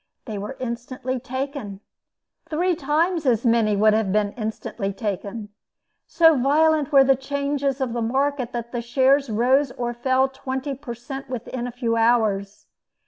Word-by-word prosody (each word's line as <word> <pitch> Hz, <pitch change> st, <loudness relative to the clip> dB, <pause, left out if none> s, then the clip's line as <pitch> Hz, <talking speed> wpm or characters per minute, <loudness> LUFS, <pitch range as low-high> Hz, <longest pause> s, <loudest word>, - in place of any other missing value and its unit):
They 215 Hz, -4 st, -5 dB
were 210 Hz, +7 st, -6 dB
instantly 255 Hz, +1 st, -4 dB
taken. 260 Hz, -5 st, -5 dB, 0.7 s
Three 355 Hz, +4 st, +1 dB
times 315 Hz, +2 st, 0 dB
as 235 Hz, -1 st, +2 dB
many 225 Hz, -3 st, +3 dB
would 215 Hz, +1 st, +4 dB
have 215 Hz, -3 st, +1 dB
been 205 Hz, 0 st, +1 dB
instantly 215 Hz, -3 st, -4 dB
taken. 205 Hz, +1 st, -4 dB, 0.6 s
So 325 Hz, -1 st, +5 dB
violent 300 Hz, +3 st, +2 dB
were 275 Hz, -2 st, +7 dB
the 270 Hz, 0 st, +4 dB
changes 280 Hz, 0 st, -2 dB
of 260 Hz, -3 st, -2 dB
the 240 Hz, -, -2 dB
market, 265 Hz, +2 st, 0 dB
that 235 Hz, 0 st, -4 dB
shares 265 Hz, +3 st, +3 dB
rose 255 Hz, +5 st, +2 dB
or 240 Hz, -1 st, -3 dB
fell 260 Hz, +2 st, +2 dB
twenty 265 Hz, +1 st, -4 dB
per 260 Hz, -3 st, -7 dB
cent. 270 Hz, +4 st, -8 dB
within 245 Hz, 0 st, -4 dB
a -, -, -5 dB
few 235 Hz, -1 st, -1 dB
hours. 215 Hz, -4 st, +1 dB
255 Hz, 150 wpm, -23 LUFS, 230-275 Hz, 0.7 s, were